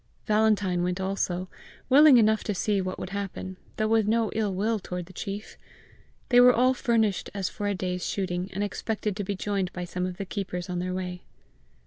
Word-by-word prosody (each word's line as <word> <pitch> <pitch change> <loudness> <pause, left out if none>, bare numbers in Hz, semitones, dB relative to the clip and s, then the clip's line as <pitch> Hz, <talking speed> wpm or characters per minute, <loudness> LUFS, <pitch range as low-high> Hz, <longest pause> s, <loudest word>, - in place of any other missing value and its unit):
Valentine 210 -4 +2
went 180 +1 -1
also, 190 -1 -1 0.4
willing 280 0 +8
enough 220 -1 +3
to 210 - -2
see 200 +1 +1
what 185 0 -4
would 185 - -6
happen, 195 -1 -5 0.2
though 215 - +1
with 220 -1 +3
no 225 0 +2
ill 215 -2 0
will 210 +4 0
toward 180 -2 -5
the 185 - -15
chief. 200 +3 -6 0.7
They 245 -1 +6
were 250 0 +8
all 255 +2 +4
furnished 230 -6 +1
as 195 -3 -1
for 205 - -4
a 205 - 0
day's 180 -1 -3
shooting, 185 -1 -2
and 200 +2 -2
expected 210 0 -2
to 205 - -3
be 200 +1 -3
joined 195 -1 -2
by 180 0 -4
some 180 +1 -3
of 180 -1 -6
the 195 - -4
keepers 180 -2 -4
on 180 - -2
their 185 +1 -2
way. 180 -1 -4
195 Hz, 200 wpm, -27 LUFS, 185-215 Hz, 0.7 s, willing